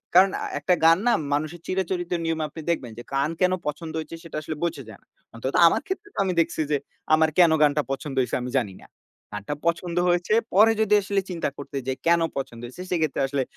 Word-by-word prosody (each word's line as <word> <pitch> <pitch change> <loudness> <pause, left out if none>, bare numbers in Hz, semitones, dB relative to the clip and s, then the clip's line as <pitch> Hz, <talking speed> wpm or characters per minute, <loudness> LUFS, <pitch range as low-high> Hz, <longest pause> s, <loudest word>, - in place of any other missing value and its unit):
কারণ 190 +1 +7 0.3
একটা 180 - +2
গান 165 +1 +7
না 240 - +5 0.2
মানুষের 155 +3 -2
চিরাচরিত 185 -1 -2
নিয়মে 165 -1 -1
আপনি 160 - -9
দেখবেন 130 -9 -1
যে 120 - -7
গান 140 +3 +1
কেন 185 - +4 0.2
পছন্দ 155 +2 -4
হয়েছে 160 +1 -6
সেটা 165 - -9
আসলে 155 +1 -5
বোঝা 165 -5 -2
যায় 105 - -12
না। - - -33 0.3
অন্তত 130 +4 -3
আমার - - +2
ক্ষেত্রে 385 +2 -4
তো - - -18
আমি 185 - 0
দেখছি 160 - -3
যে 145 - +3 0.4
আমার 160 0 +5
কেন 175 -3 +7
গানটা 150 0 +4
পছন্দ 135 0 -4
হইছে 125 - -1
আমি 125 - -4
জানি 100 -6 -5
না। - - -16 0.5
গানটা 105 +8 -4
পছন্দ 170 0 -1
হয়েছে 175 +3 +1 0.2
পরে 215 +4 +7
যদি 210 -1 +2
আসলে 195 0 0
চিন্তা 170 -4 -2
করতে 140 0 -6
যাই 130 0 -1
কেন 170 0 +5 0.2
পছন্দ 120 -4 -5
হইছে 130 +9 -10
সেক্ষেত্রে 160 -6 0
আসলে 135 -1 -1
160 Hz, 210 wpm, -25 LUFS, 140-175 Hz, 0.5 s, কারণ